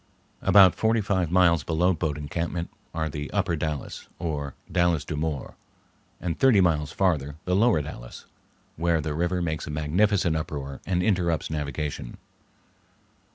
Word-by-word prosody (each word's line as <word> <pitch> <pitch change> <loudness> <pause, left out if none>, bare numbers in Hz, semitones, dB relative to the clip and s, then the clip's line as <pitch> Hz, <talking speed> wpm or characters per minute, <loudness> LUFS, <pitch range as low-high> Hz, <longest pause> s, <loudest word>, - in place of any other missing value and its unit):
About 95 -3 +7
forty 110 +1 +1
five 95 -5 0
miles 85 -3 +4
below 85 +3 +2
Boat 80 -3 -2
Encampment 85 +3 -3 0.2
are 80 -1 -2
the 75 -1 -5
Upper 85 - 0
Dalles, 75 -2 -4
or 70 -5 -4 0.2
Dalles 85 -4 +2
de 75 - -4
Mort, 75 -2 -3 0.7
and 85 -2 -3
thirty 130 -6 +5
miles 80 -5 +2
farther 75 -7 0
the 90 - +1
Lower 105 -7 +3
Dalles, - - -9 0.5
where 85 0 +2
the 75 -1 -3
river 90 +3 0
makes 80 -2 -3
a - - -5
magnificent 85 +4 +1
uproar 70 -3 -5
and 90 -2 +1
interrupts 85 -7 0
navigation. 75 -4 -4
80 Hz, 145 wpm, -26 LUFS, 75-90 Hz, 0.7 s, About